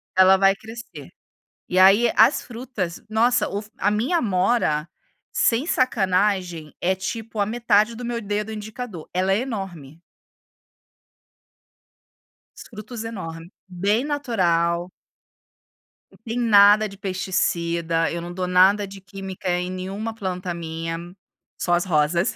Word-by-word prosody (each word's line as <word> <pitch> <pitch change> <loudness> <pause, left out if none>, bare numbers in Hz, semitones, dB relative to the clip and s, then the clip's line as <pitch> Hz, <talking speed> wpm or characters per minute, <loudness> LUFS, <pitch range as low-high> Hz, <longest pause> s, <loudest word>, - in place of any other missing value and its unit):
Ela 190 +1 +6
vai 195 0 +4
crescer. 220 - -10 0.6
E 185 - +2
aí 200 +5 +6
as 225 +7 +5
frutas, 230 -8 -5
nossa, 235 +3 +2
o 200 - -3
f 210 - -15
a 205 - +2
minha 240 +12 +1
amora, 185 - +1 0.4
sem 235 +5 +2
sacanagem, 190 - 0
é 185 +2 +1
tipo 220 +3 -5
a 205 - +3
metade 225 0 +2
do 245 - -8
meu 235 0 -2
dedo 210 +1 -3
indicador, 215 -4 -7
ela 185 +2 +1
é 200 - +2
enorme. 180 - -6 2.5
Os - - -10
frutos 220 +1 -8
enorme, 170 -6 -7 0.2
bem 200 +6 0
natural 180 - 0 1.4
tem 230 +1 -3
nada 210 -2 +6
de 195 -1 -12
pesticida, 170 -3 -1
eu 170 - -4
não 175 +1 -7
dou 180 0 -3
nada 190 +3 +4
de 195 0 -11
química 190 0 -7
em 180 0 0
nenhuma 195 +5 -5
planta 185 -4 -4
minha, 165 0 -5 0.6
só 175 - 0
as 175 +1 +2
rosas. 170 +3 +1
195 Hz, 130 wpm, -23 LUFS, 175-220 Hz, 2.5 s, Ela